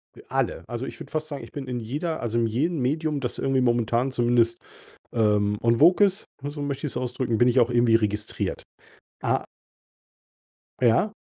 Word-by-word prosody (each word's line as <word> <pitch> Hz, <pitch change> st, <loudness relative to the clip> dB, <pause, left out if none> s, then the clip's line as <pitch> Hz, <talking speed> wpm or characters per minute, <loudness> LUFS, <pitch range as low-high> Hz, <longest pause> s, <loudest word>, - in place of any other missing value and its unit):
D -, -, -14 dB
alle. -, -, -1 dB
Also, -, -, -4 dB
ich -, -, -8 dB
würde -, -, -10 dB
fast 155 Hz, 0 st, -2 dB
sagen, 145 Hz, -2 st, -6 dB
ich -, -, -11 dB
bin 140 Hz, -2 st, -6 dB
in 125 Hz, -1 st, -3 dB
jeder 150 Hz, +8 st, -3 dB
also, 115 Hz, 0 st, -1 dB
in 115 Hz, -, +2 dB
jedem 150 Hz, +8 st, 0 dB
Medium, 150 Hz, +3 st, 0 dB
das 125 Hz, -3 st, -3 dB
irgendwie 135 Hz, -1 st, +1 dB
momentan 120 Hz, +1 st, +1 dB
zumindest, 120 Hz, -1 st, +2 dB, 0.5 s
ähm, 105 Hz, -2 st, +2 dB
en 115 Hz, 0 st, +3 dB
vogue 180 Hz, +6 st, +6 dB
ist, 195 Hz, +1 st, -1 dB, 0.2 s
ne, 145 Hz, -, -4 dB
so 145 Hz, -1 st, -6 dB
möchte 140 Hz, +1 st, -3 dB
ich's -, -, -3 dB
ausdrücken 125 Hz, -2 st, -1 dB
bin 120 Hz, -, +4 dB
ich 125 Hz, +1 st, +4 dB
auch 120 Hz, 0 st, +4 dB
irgendwie 120 Hz, -1 st, +4 dB
registriert. 105 Hz, -2 st, -1 dB, 0.6 s
Ah -, -, 0 dB, 1.4 s
Ja? 125 Hz, -, +3 dB
125 Hz, 185 wpm, -25 LUFS, 115-145 Hz, 1.4 s, vogue